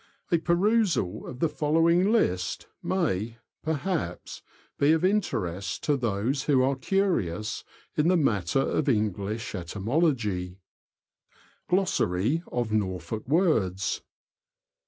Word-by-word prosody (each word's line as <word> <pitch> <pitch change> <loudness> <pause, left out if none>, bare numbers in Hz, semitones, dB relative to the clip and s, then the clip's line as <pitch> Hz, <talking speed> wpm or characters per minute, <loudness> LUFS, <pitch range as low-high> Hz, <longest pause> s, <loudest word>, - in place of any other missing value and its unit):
A 170 - +4
perusal 175 - +1
of 125 - -7
the 165 - +4
following 165 +5 +2
list 90 - +1 0.2
may, 115 - -1 0.3
perhaps, 160 - -3 0.4
be 145 +2 +5
of 160 +2 +2
interest 100 - -1
to 145 - +2
those 120 +2 -1
who 135 -3 +4
are 135 +1 +2
curious 130 - -1 0.3
in 150 +1 +2
the 180 0 +4
matter 105 - +1
of 145 +1 0
English 105 -1 -1
etymology: 100 - -1 0.6
— - - -34
Glossary 155 - +1
of 120 -3 -1
Norfolk 95 0 -2
Words. 115 - +1
130 Hz, 110 wpm, -27 LUFS, 100-165 Hz, 0.6 s, be